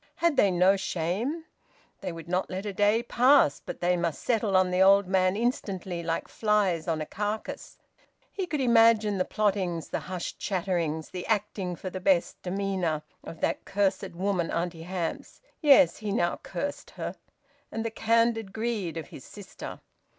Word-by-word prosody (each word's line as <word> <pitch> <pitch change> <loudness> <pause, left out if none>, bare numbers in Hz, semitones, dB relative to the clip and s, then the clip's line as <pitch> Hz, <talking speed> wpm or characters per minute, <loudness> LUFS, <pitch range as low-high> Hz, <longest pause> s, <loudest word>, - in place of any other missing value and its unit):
Had 340 -3 +2
they 200 - +5
no 185 +2 +4
shame? 195 - -2 0.5
They - - -4
would 165 0 -9
not 180 +2 -1
let 190 +2 -4
a 205 - -3
day 205 +4 +3
pass; 250 - +4
but - - -7
they 180 +1 +3
must 170 -3 -2
settle 215 -5 +2
on 185 -1 +3
the 180 +1 +2
old 195 +1 +6
man 185 0 +2
instantly, 195 -6 -2
like 165 -1 -2
flies 205 -7 +1
on 160 -2 0
a - - -2
carcass! 210 +5 -4 0.5
He 380 -3 -3
could 300 -4 -2
imagine 225 -4 +4
the 185 - +2
plottings, 190 -6 -1
the - - -2
hushed 185 -2 -6
chatterings; 170 -5 -1
the 180 -1 -6
acting 200 -4 -1
for 185 +2 -6
the 185 - -5
best 185 -2 +1
demeanour 185 -5 -1 0.2
of 165 - -9
that - - 0
cursed 195 -2 -1
woman 185 -2 0
Auntie 170 -1 -2
Hamps 175 -1 -4 0.2
(yes, 275 - +6
he 210 -1 -4
now 175 -5 +1
cursed 285 0 -5
her), - - -4 0.6
and 225 0 -3
the 230 - -2
candid 225 -2 +1
greed 220 -7 -2
of 160 - -6
his 130 - -11
sister. 205 -2 -9
190 Hz, 170 wpm, -28 LUFS, 175-220 Hz, 0.6 s, old